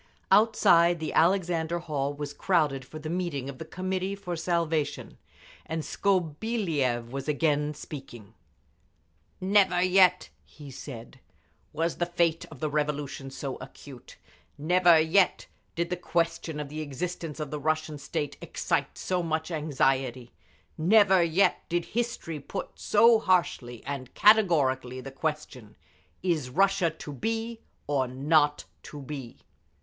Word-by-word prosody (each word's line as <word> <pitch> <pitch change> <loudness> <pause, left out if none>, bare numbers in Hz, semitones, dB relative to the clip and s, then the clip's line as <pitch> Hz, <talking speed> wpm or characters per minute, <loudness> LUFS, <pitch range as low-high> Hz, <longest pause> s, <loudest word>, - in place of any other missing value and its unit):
Outside, 175 -5 +5
the 160 - -4
Alexander 170 -2 +2
Hall 145 -5 -2
was 145 0 -5
crowded 150 -6 +1
for 155 - -10
the 155 0 -7
meeting 160 -6 -3
of 130 - -15
the 160 - -6
Committee 185 +3 -3
for 180 -3 -5
Salvation, 165 -2 -2 0.5
and 160 0 -3
Skobeliev 165 - -1
was 135 +2 -5
again 150 0 +1
speaking. 130 -8 -10 1.1
"Never 190 -1 +3
yet," 185 0 +4
he 145 -3 -13
said, 125 -3 -9 0.5
"was 165 +2 -1
the 175 - 0
fate 170 -2 +1
of 150 -6 -13
the 155 - 0
Revolution 145 -2 -2
so 135 0 -5
acute, 135 -4 -12 0.4
never 175 +2 +5
yet 180 +4 +3 0.3
did 170 +1 -2
the - - +1
question 165 -2 -1
of 150 -1 -5
the 155 +1 -5
existence 160 +2 -5
of 150 -2 -4
the 150 - -3
Russian 155 0 -1
state 145 +1 -4
excite - - -2
so 180 -1 -1
much 160 0 -2
anxiety, 135 -5 0 0.5
never 190 +2 +5
yet 170 +4 +2
did 175 0 0
history 230 -9 -3
put 190 +7 -6
so 225 +2 +4
harshly 145 - 0
and 135 -2 -5
categorically 140 - +3
the 135 +1 -8
question—is 150 - -5
Russia 195 +3 +2
to 155 -2 -9
be 225 - -3 0.3
or 140 -3 0
not 145 +3 +2 0.2
to 150 - -10
be! 135 -4 -7
160 Hz, 130 wpm, -27 LUFS, 140-180 Hz, 1.1 s, Outside